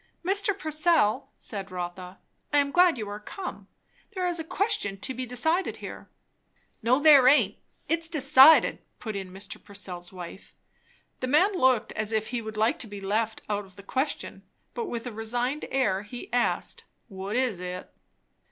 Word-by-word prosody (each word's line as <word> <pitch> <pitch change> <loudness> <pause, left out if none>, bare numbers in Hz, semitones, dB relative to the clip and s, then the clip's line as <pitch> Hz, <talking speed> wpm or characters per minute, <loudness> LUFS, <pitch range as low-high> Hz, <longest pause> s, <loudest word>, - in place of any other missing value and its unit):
"Mr. 400 +1 +3
Purcell," 305 - +1
said 200 -2 -6
Rotha, 180 0 -6 0.3
"I 290 - +3
am 280 -1 +2
glad 355 -2 +5
you 215 -2 -4
are 205 +1 -6
come; 365 - -7 0.5
there 370 -1 -1
is 350 -1 0
a - - -2
question 365 - -1
to 260 - -3
be 255 0 -5
decided 320 +10 0
here." - - -9 0.7
"No 245 +4 +3
there 290 -4 +7
aint; 245 -8 +4 0.3
it's 330 0 +1
decided," 300 -1 +6 0.2
put 220 -3 -6
in 190 -2 -5
Mr. 195 +2 -8
Purcell's 180 -3 -7
wife. 180 0 -10 0.6
The 255 - -2
man 360 +10 +4
looked 260 - +2
as 215 0 -1
if 220 -1 -1
he 245 -1 -2
would 220 -1 -7
like 220 +2 +2
to 240 - -4
be 205 -1 -8
left 215 +3 -1
out 205 -1 -1
of 190 -2 -18
the 200 - -12
question; 265 +8 -3 0.3
but 470 - -3
with 235 -5 -5
a 245 - -4
resigned 240 +6 -2
air 205 -8 +1
he 240 +4 -10
asked, 245 -1 0 0.2
"What 195 0 -5
is 250 -7 +1
it?" 180 0 -7
240 Hz, 170 wpm, -27 LUFS, 205-300 Hz, 0.7 s, there